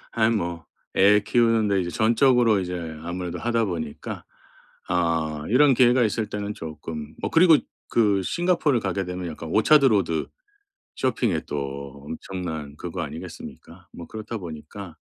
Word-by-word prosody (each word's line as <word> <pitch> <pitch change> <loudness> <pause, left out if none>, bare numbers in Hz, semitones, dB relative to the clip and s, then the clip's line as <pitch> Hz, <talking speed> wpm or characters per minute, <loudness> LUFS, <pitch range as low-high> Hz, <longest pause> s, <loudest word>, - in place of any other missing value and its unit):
아이 110 -1 +2
뭐 85 -7 -2 0.3
애 105 +2 +6
키우는데 110 -3 +2
이제 85 - -3
전적으로 115 0 +3
이제 90 -1 -4 0.3
아무래도 90 0 -4
하다 115 +1 +1
보니까 80 -7 -5 0.7
어 80 -3 0
이런 135 +4 +5
기회가 125 +1 +5
있을 110 0 -1
때는 105 0 -4
쪼끔 80 -1 -7
뭐 - - -2
그리고 165 -1 +7 0.3
그 105 -4 +3
싱가포르를 165 - +1
가게 95 -1 -2
되면 90 0 -5
약간 80 +1 -7
오차드 140 - +5
로드 95 -8 +1 0.7
쇼핑에 115 -10 0
또 70 -1 -5
엄청난 80 -4 -6
그거 - - -6
아니겠습니까? 90 +2 -9
뭐 85 - -9
그렇다 110 +1 -6
보니까 85 +1 -9
95 Hz, 320 characters per minute, -24 LUFS, 80-115 Hz, 0.7 s, 그리고